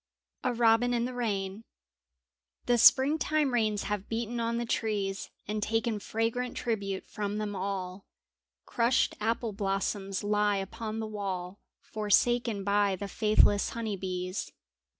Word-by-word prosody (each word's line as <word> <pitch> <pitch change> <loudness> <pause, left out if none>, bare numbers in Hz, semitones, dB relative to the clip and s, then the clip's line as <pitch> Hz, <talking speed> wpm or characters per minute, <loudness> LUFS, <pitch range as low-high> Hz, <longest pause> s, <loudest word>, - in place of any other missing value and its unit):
a - - +2
IRobin 235 +1 +3
in 235 0 +1
tbe 250 - -3
IRain 205 -4 -2 1.0
HE 245 0 +3
springtime 290 +3 +4
rains 215 -3 +1
have 205 -1 -3
beaten 235 +1 -2
on 230 0 0
the 235 - -1
trees 205 -4 -2 0.2
And 210 +1 -2
taken 225 0 0
fragrant 230 +4 -2
tribute 200 -5 -2
from 205 0 -3
them 210 -1 -3
all; 190 -1 -4 0.6
Crushed 235 +1 +2
apple 225 0 -1
blossoms 195 0 -2
lie 205 0 +2
upon 215 +3 -5
the - - -3
wall 195 -3 -4 0.2
Forsaken 220 0 +1
by 200 -1 +2
the 200 +2 -5
faithless 210 -1 +3
honey 220 -3 -2
bees. 185 0 -4
210 Hz, 130 wpm, -29 LUFS, 200-230 Hz, 1.0 s, springtime